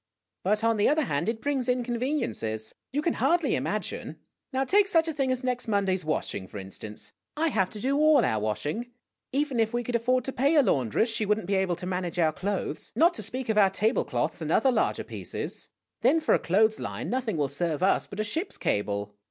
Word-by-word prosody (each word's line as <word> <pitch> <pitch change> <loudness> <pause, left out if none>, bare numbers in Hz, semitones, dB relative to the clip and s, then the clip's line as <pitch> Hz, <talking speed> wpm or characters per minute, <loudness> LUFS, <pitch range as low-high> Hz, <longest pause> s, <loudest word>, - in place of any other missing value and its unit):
But, 210 +3 +1
on 230 -1 +3
the 205 - +4
other 305 +2 +3
hand, 145 - -1
it 225 -1 -4
brings 270 -3 0
inconveniences. 240 - -1 0.2
You 295 +3 -1
can 335 - +1
hardly 345 -1 +2
ima - - -1
gine. - - -6 0.4
Now, 265 0 +1
take 395 +8 +4
such 330 -4 +3
a 320 - -2
thing 270 -3 0
as 255 0 -1
next 250 -1 -1
Monday's 195 -3 +1
washing, 155 -10 -2
for - - -9
in 95 0 -8
stance. 105 0 -7 0.3
I 325 +1 +2
have 190 -9 +1
to 210 - -8
do 265 +6 0
all 305 -4 +5
our 110 -2 +1
washing. 145 - -2 0.4
Even 275 -2 0
if 225 0 +1
we 240 - 0
could 240 0 -3
afford 250 +2 +2
to 270 - -3
o - - -19
pay 280 +6 +3
a 295 - +6
laundress, 140 - +1
she 220 -2 -1
would 210 +1 +3
n't 220 - -6
be 200 - -1
able 190 -2 +1
to 180 - -7
manage 180 -1 -3
our 160 -3 +3
clothes, 200 +4 -3
not 340 +2 +5
to - - -5
speak 260 0 -3
of 220 -1 +2
our 195 -2 +6
table 215 +5 +1
cloths - - -2
and - - -2
other 265 - +4
larger - - 0
pieces. - - -5 0.3
Then, 325 - +4
for 315 - +2
a - - +4
clothes 215 +5 +2
line, - - -4
nothing 245 -7 -1
will 145 -2 +1
serve 160 +3 -2
us 195 - +2
but 200 - -9
a - - +2
ship's 320 - -3
cable. 100 0 -1
220 Hz, 235 wpm, -27 LUFS, 175-265 Hz, 0.4 s, a